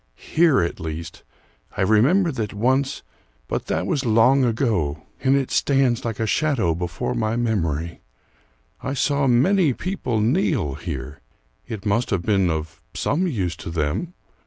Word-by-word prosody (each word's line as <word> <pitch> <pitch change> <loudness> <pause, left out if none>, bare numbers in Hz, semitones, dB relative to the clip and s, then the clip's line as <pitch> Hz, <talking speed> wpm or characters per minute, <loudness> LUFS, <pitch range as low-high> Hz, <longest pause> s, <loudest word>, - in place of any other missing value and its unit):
"Here 160 - +3
at 85 - -2
least 80 +1 -6 0.6
I - - +2
remember 140 - +4
that 110 -6 -4
once 130 +5 0 0.4
but - - -3
that - - -1
was 140 - -1
long 120 +4 +4
ago, 105 - 0 0.2
and 135 0 +4
it 135 -2 0
stands 135 -3 +2
like 115 -3 -4
a 115 - +1
shadow 120 - +1
before 90 +2 -3
my 110 0 -1
memory 85 -9 -1 0.8
I 135 - -3
saw 140 0 +1
many 145 +6 +3
people 170 - -2
kneel 115 - +1
here: 75 -2 -6 0.5
it 105 -2 -6
must 110 +4 +1
have 95 -4 0
been 95 -4 +2
of 80 0 -4
some 180 +6 0
use 95 - -2
to 80 - -7
them? 85 - -2
115 Hz, 150 wpm, -22 LUFS, 85-135 Hz, 0.8 s, remember